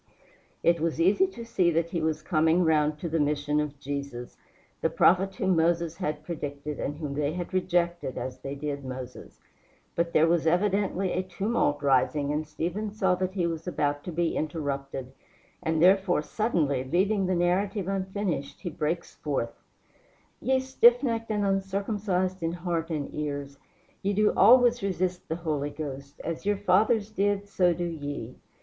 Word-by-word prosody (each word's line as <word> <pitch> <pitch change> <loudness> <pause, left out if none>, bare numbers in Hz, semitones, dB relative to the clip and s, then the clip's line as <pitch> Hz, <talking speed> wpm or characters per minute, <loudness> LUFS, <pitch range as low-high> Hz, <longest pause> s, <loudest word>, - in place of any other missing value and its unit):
It 170 0 +4
was 165 0 -1
easy 195 - +4
to 235 -11 -9
see 185 -6 +2
that 165 0 0
he 170 - -1
was 155 -1 -1
coming 160 +1 +3
round 155 -2 +2
to 170 - -4
the 165 0 0
mission 145 0 +1
of 150 -1 -3
Jesus, 140 -3 -5 0.5
the 160 - +2
prophet 185 +4 +3
whom 190 0 +1
Moses 165 0 +1
had 150 -1 -3
predicted, 150 -3 -5
and 145 - -3
whom 150 -3 -4
they 145 +1 -1
had 180 +1 -5
rejected 175 -5 0
as 130 0 -5
they 135 +2 -5
did 140 0 -4
Moses. 130 -1 -8 0.6
But 170 0 0
there 155 - +5
was 165 -1 +2
evidently 195 +1 +1
a 185 - 0
tumult 185 -5 -1
rising, 140 +2 +2
and 150 +1 -2
Stephen 175 +8 -3
saw 195 -3 +1
that 185 +1 -2
he 180 -3 +1
was 165 0 -3
about 145 -4 -1
to 180 - -4
be 170 0 0
interrupted, 140 -4 -3 0.5
and 160 0 +1
therefore, 185 -3 +4
suddenly, 150 - 0
leaving 190 +7 +1
the 185 - +1
narrative 185 +3 0
unfinished, 190 -6 -3
he 175 - -4
breaks 160 +3 -2
forth: 135 -6 -2 0.9
"Ye 265 +1 +2
stiffnecked 240 -3 +3
and 210 -2 0
uncircumcised 195 -1 -1
in 165 0 -1
heart 170 -1 -2
and 150 -4 -3
ears, 140 -2 -4 0.4
ye 200 +1 0
do 210 +1 +3
always 245 -1 +6
resist 185 -2 -2
the 160 - 0
Holy 155 -4 -2
Ghost 140 -1 -7
as 165 0 -4
your 205 0 +1
fathers 205 +3 +2
did 205 0 0
so 180 -3 +3
do 175 +1 -2
ye. 145 -7 -5
170 Hz, 165 wpm, -27 LUFS, 150-190 Hz, 0.9 s, always